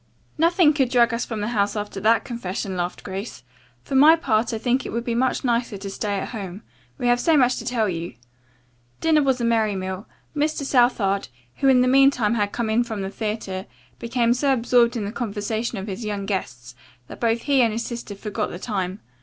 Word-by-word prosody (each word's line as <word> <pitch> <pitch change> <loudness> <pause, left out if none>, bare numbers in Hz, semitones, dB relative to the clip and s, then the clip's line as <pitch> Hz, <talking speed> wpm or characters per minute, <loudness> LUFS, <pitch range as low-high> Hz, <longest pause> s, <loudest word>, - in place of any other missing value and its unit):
"Nothing 335 -1 +4
could 270 -4 +1
drag 240 -2 +3
us 235 - -1
from 220 -3 -4
the 210 - -2
house 205 -3 0
after 205 -1 -4
that 225 +3 +3
confession," 195 -5 -4
laughed 175 0 -3
Grace. 190 - -6 0.4
"For - - -7
my 295 +5 +7
part 230 -8 0
I 225 - -2
think 245 +3 0
it - - -6
would 235 +1 -3
be 235 - -2
much 255 +4 0
nicer 235 -3 0
to 195 0 -7
stay 205 +1 -2
at - - -4
home. 200 -2 -7 0.3
We 255 - -4
have 245 0 +3
so 320 +4 +3
much 255 -2 +3
to - - -6
tell 235 -4 0
you." 170 -5 -4 0.8
Dinner 315 -2 +3
was 265 -2 +1
a 235 - 0
merry 220 -3 +2
meal. 190 +1 -5 0.3
Mr. 300 0 0
Southard, 240 -7 +2 0.3
who 275 - +1
in 260 -2 +6
the 250 - +3
meantime 265 -4 +4
had 205 -3 0
come 230 -2 -2
in 235 +2 +3
from 220 -4 -5
the 190 - -4
theatre, 210 -3 -4 0.3
became 235 0 +1
so 275 +3 +1
absorbed 240 0 +3
in 210 - -2
the 200 - -4
conversation 220 0 -3
of 190 - -4
his 200 +2 -6
young 205 -2 -3
guests 125 - -4 0.3
that - - -11
both 230 0 0
he 280 -3 +3
and 230 -2 +3
his 230 +2 -3
sister 235 -4 -6
forgot 210 +1 -3
the - - -7
time. 190 -1 -3
230 Hz, 215 wpm, -23 LUFS, 200-250 Hz, 0.8 s, my